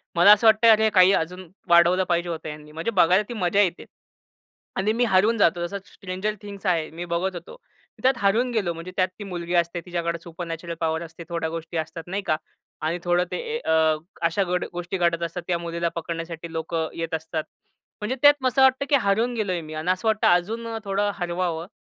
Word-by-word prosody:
मला 175 +4 +7
असं 210 +2 +6
वाटतंय 220 +1 +7
हे 220 - +4
काही 185 -2 +6
अजून 180 +1 -2 0.2
वाढवलं 175 +2 +5
पाहिजे 175 -1 0
होतं 165 -2 -5
ह्यांनी 150 0 -10
म्हणजे 165 +8 -3
बघायला 185 0 +4
ती - - -4
मजा 200 -2 +2
येते 180 -4 0 0.9
आणि 210 +3 +1
मी 245 +2 +1
हरवून 220 +2 +3
जातो. 175 -3 +2
जसा 200 - -5
स्ट्रेंजर 190 +3 -4
थिंग्ज 205 -1 -10
आहे. 165 -3 +1
मी 170 +2 -6
बघत 185 +2 -1
होतो. 175 - -9 0.5
त्यात 260 +1 +5
हरवून 220 +6 +2
गेलो 200 -7 0
म्हणजे 165 +2 -8
त्यात 185 -1 +3
ती - - -5
मुलगी 175 -3 -5
असते 170 0 +1
तिच्याकडे 170 -1 -2
सुपर 170 +1 -7
नॅचरल 165 +1 -5
पॉवर 160 0 0
असते 165 +1 -10
थोड्या 165 -2 -2
गोष्टी 165 0 -5
असतात 160 +1 -4
नाही 195 +3 -2
का 155 - +2 0.5
आणि 170 +3 -1
थोडं 175 0 +2
ते - - -2 0.2
ए 470 - -2
अ, 160 -1 +3 0.3
अशा 165 +4 +1
घड 180 -1 -1
गोष्टी 175 +2 -4
घडत 170 -1 +1
असतात 170 +1 -4
त्या 175 -2 +1
मुलीला 170 0 -2
पकडण्यासाठी 165 0 -5
लोकं 160 0 -2
येत 165 -1 -4
असतात. 160 0 -3 0.6
म्हणजे 210 +5 -2
त्यात 290 0 +8
मग 260 - +2
असं 255 +2 +2
वाटतं 265 +1 +4
की 285 - +5
हरवून 225 +5 +1
गेलोय 190 -6 -1
मी 155 -1 -9
आणि 155 +3 -1
असं 185 +4 -2
वाटतं 220 -1 +3
अजून 215 +7 +1
अ, 225 0 -4
थोडं 200 +1 0
हरवावं. 175 -2 -2
175 Hz, 210 wpm, -24 LUFS, 165-200 Hz, 0.9 s, त्यात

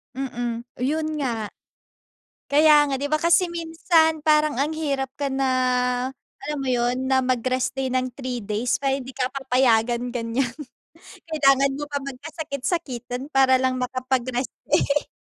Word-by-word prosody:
Mm, 240 -3 -3 0.2
'yon 305 +5 -1
nga. 230 -7 -2 1.0
Kaya 295 0 +6
nga, 270 - 0
'di 285 +2 -3
ba, 310 - +2
kasi 340 +3 +4
minsan 325 -1 +1
parang 305 -2 +3
ang 285 +4 0
hirap 275 -4 -2
ka 285 - 0
na, 270 0 -1 1.0
alam 300 0 -3
mo 260 - -2
'yon, 245 0 +1
na 265 0 +3
mag-rest 255 0 -1
day 265 -1 -2
ng 255 0 0
3 255 -3 -4
days. 215 +5 -1
Parang 270 -1 0
hindi 260 - -9
ka 255 -1 -1
papayagan, 250 -3 +1
ganyan. 240 +1 -2 0.7
Kailangan 275 -3 +3
mo 295 - -4
pa 285 - -1
magkasakit-sakitan 275 -2 -4
para 260 -1 +5
lang 260 0 +1
makapag-rest 255 0 -2 0.2
day. 285 +1 +2
270 Hz, 140 wpm, -23 LUFS, 250-295 Hz, 1.0 s, Kaya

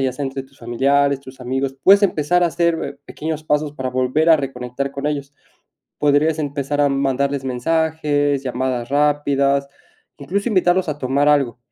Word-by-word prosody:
ya 130 -1 0
sea 140 +2 -4
entre 135 0 -4
tus 135 0 -22
familiares, 135 +4 +1
tus 130 -1 -13
amigos, 135 +2 -2
puedes 200 +2 +6
empezar 180 -1 +2
a - - +4
hacer 165 -4 -1
pequeños 155 0 -5
pasos 150 -1 0
para 130 -3 -4
volver 130 +6 +1
a 160 - +7
reconectar 135 -1 -4
con 140 +1 -5
ellos, 140 -1 -3 0.7
podrías 150 +2 +2
empezar 145 0 -2
a 145 - +4
mandarles 140 0 0
mensajes, 145 +1 0
llamadas 125 -1 -2
rápidas, 140 -1 +1 0.5
incluso 200 - -2
invitarlos 185 -3 +2
a 150 -1 -3
tomar 140 +2 +1
algo, 135 -6 +2
140 Hz, 160 wpm, -20 LUFS, 135-150 Hz, 0.7 s, a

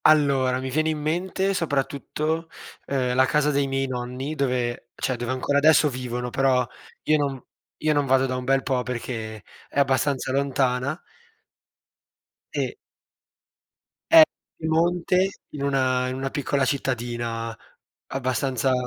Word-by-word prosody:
Allora, 135 -4 +4
mi 130 0 -4
viene 155 +3 +1
in 155 - -1
mente 180 +5 0
soprattutto, 155 +1 -1 0.4
uhm, 130 -3 0
la 130 +1 +5
casa 150 0 +2
dei 140 -1 +1
miei 135 0 0
nonni 130 +3 -4
dove 125 -4 -1
cioè, 130 - -1
dove 120 0 -4
ancora 140 +2 +1
adesso 155 0 +5
vivono, 125 -1 -4
però 130 -2 +2 0.4
io 155 - +3
non 140 -2 -1 0.4
io 155 0 +3
non 145 -1 +2
vado 135 0 +4
da 130 - -2
un 125 - -3
bel 135 +1 +2
po' 130 -3 0
perché 115 -4 -5 0.2
è - - -2
abbastanza 135 -1 +1
lontana. 135 +1 0 1.5
E - - -2 1.4
è 325 -1 +12 0.3
Piemonte 175 +3 +2 0.2
in 145 -2 -5
una 130 -2 +1
in 130 - -3
una 135 +1 -2
piccola 140 -1 0
cittadina 120 -4 -2 0.5
abbastanza 130 0 0
135 Hz, 135 wpm, -24 LUFS, 125-150 Hz, 1.5 s, è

